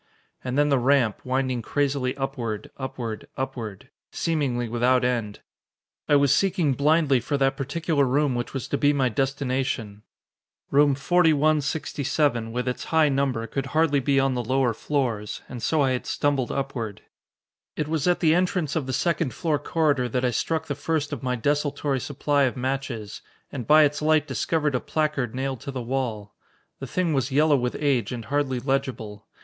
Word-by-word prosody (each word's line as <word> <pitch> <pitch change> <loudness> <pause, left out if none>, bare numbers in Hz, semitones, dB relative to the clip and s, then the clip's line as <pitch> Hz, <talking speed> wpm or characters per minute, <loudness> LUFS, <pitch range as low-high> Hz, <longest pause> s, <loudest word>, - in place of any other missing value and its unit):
And 125 +1 -2
then 145 0 +3
the 140 -2 +3
ramp, 125 -4 +2
winding 130 -1 -1
crazily 135 +1 -1
upward 125 -6 -4
upward 120 -5 -5
upward, 115 -6 -5 0.2
seemingly 135 -7 -1
without 125 +2 +2
end. 115 -5 -2 0.7
I 145 - +5
was 140 -2 +4
seeking 185 -7 +2
blindly 145 -1 +3
for 145 +4 -2
that 135 0 +2
particular 145 +2 0
room 140 +1 +1
which 120 0 -3
was 135 - -4
to 140 - -1
be 145 0 +4
my 135 -3 +2
destination. 130 -4 -2 0.7
Room 145 0 +4
4167, 150 -5 +1
with 125 +2 -3
its 125 - -3
high 160 -2 +3
number, 135 -4 0
could 135 +3 -4
hardly 155 -3 +3
be 135 +1 +2
on 135 0 +2
the 125 -1 -2
lower 130 0 +1
floors, 115 -5 -2
and 125 -2 -7
so 155 +6 +1
I 135 -2 +2
had 125 - -2
stumbled 140 -4 0
upward.... 125 -6 -4 0.7
It 150 - -2
was 160 0 -1
at 180 - +2
the 160 -2 +4
entrance 180 -4 0
of 150 -5 -1
the 130 - -2
second 165 -5 0
floor 155 -3 0
corridor 145 -5 +1
that 125 +2 0
I 125 - +2
struck 160 +6 -1
the 145 - -3
first 145 +1 -2
of 135 - -5
my 125 -1 -1
desultory 145 +2 0
supply 145 +1 +1
of 130 - -2
matches, 125 -5 -3 0.3
and 130 -5 -6
by 155 +1 +7
its 145 0 +1
light 155 0 +3
discovered 150 -3 -1
a 125 - +1
placard 150 -7 -1
nailed 135 -1 -2
to - - -7
the 135 -2 -4
wall. 115 -5 -3 0.5
The 135 - -6
thing 175 +3 0
was 135 -1 0
yellow 150 +2 +4
with 125 -2 -1
age 135 -7 +1
and 120 -3 -5
hardly 140 -3 0
legible. 120 -6 -3
135 Hz, 175 wpm, -25 LUFS, 125-145 Hz, 0.7 s, by